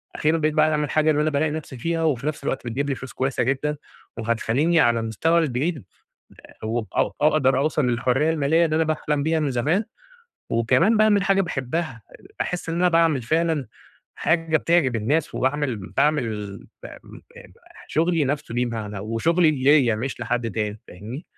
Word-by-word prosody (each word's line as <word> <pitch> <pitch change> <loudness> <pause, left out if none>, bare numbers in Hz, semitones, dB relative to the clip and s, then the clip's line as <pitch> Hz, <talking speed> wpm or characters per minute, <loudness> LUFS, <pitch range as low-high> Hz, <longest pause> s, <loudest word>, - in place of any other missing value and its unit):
أخيرًا 155 +2 +1
بقيت 155 -1 0
باعمل 155 -1 +2
حاجة 155 +2 +2
اللي 150 0 +1
أنا 155 - +1
بالاقي 150 +1 0
نَفسي 150 -3 -6
فيها 165 +6 -2
وفي 145 -3 0
نَفس 155 -1 -3
الوقت 130 -2 -3
بتجيب 140 +5 -2
لي 135 - 0
فلوس 130 0 -9
كويسة 135 0 -1
جدًا، 140 +4 -1 0.4
وهتخلّيني 115 +8 +1
على 120 -6 +3
المستوى 115 +10 +1
البعيد 150 0 -1 0.6
آآ، - - -12
وأ 115 +1 -1
أ - - +1
أقدر 145 -3 +3
أوصل 150 -1 +1
للحرية 125 +5 +1
المالية 160 +1 +2
اللي 155 -1 0
أنا 160 - +3
باحلم 150 -2 -1
بيها 160 +1 +1
من 150 -3 0
زمان 150 - 0 0.6
وكمان 130 - +3
باعمل 210 -2 +4
حاجة 195 0 +3
باحبها، 150 -5 -3
آآ، - - -16
أحس 180 -2 -3
إن 165 - -2
أنا 180 +1 +3
باعمل 165 -5 +3
فعلًا 160 +2 0 0.5
حاجة 165 -1 +1
بتعجب 160 -7 +2
الناس، 140 +9 -1
وباعمل 135 -2 0 0.2
باعمل 110 -9 0 0.3
ب - - -6 0.2
م - - -13 0.5
مح - - -15
شغلي 165 -1 +1
نَفسه 140 -3 -3
ليه 125 +1 +1
معنى 110 -4 -5
وشغلي 155 - +2
ليّا 135 -4 +3
مش 125 +5 -4
لحد 120 -2 -2
تاني، 105 0 -3
فاهمني؟ 110 - -9
145 Hz, 175 wpm, -23 LUFS, 120-160 Hz, 0.6 s, باعمل